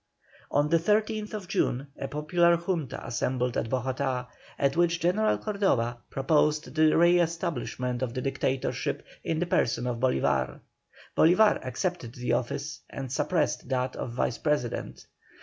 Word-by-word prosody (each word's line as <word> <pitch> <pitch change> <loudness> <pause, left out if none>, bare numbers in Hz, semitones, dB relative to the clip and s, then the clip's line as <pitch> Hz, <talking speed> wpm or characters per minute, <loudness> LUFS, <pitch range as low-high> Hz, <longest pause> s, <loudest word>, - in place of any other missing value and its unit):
On 145 +1 +2
the 165 +1 +4
13th 210 +1 0
June 140 -8 0
a 135 - -5
popular 170 +4 +3
Junta 170 -5 -3
assembled 125 +1 -1
at 115 - -1
Bogotá, 130 0 -1 0.3
at 140 0 +1
which 170 0 +2
General 190 +6 +2
Cordoba 135 - 0
proposed 150 +2 +1
the 155 0 +4
re 175 +1 +5
establishment 140 -7 -2
of 120 -3 -2
the 130 - -1
Dictatorship 135 0 -2 0.2
in 160 - -1
the 175 - 0
person 120 -7 +1
of 125 -1 -1
Bolívar. 65 - +1 0.5
Bolívar 195 +6 +5
accepted 130 0 -3
the 125 0 -1
office, 140 +5 -2
and 135 -3 -6
suppressed 170 +3 0
that 130 -1 -1
of 115 - -5
Vice 120 -1 -1
President. 150 -6 -2
145 Hz, 140 wpm, -28 LUFS, 125-170 Hz, 0.5 s, re